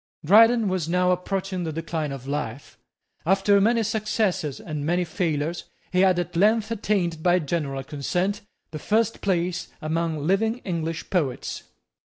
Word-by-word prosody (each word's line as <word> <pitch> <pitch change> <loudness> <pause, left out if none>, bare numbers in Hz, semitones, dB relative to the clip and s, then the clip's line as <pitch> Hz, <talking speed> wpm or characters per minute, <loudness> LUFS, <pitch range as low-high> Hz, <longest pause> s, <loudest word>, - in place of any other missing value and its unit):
Dryden 225 +5 +6
was 185 -4 -1
now 180 +1 +2
approaching 185 0 -2
the 160 - -3
decline 160 -1 -3
of 135 -1 -7
life. 140 -2 -4 0.5
After 195 +3 +3
many 230 +2 +3
successes 215 - -1
and 150 -3 -5
many 175 +4 +1
failures, 165 -2 -2 0.3
he 180 - +1
had 185 -1 +4
at 175 0 -3
length 215 +4 +3
attained, 195 -7 -1
by 175 +1 +4
general 145 -4 -2
consent, 180 - -2 0.3
the 155 - -6
first 225 +4 0
place 180 -2 -1
among 160 -1 -2
living 220 +6 +1
English 165 -2 -3
poets. 150 -9 -2
175 Hz, 145 wpm, -24 LUFS, 155-200 Hz, 0.5 s, Dryden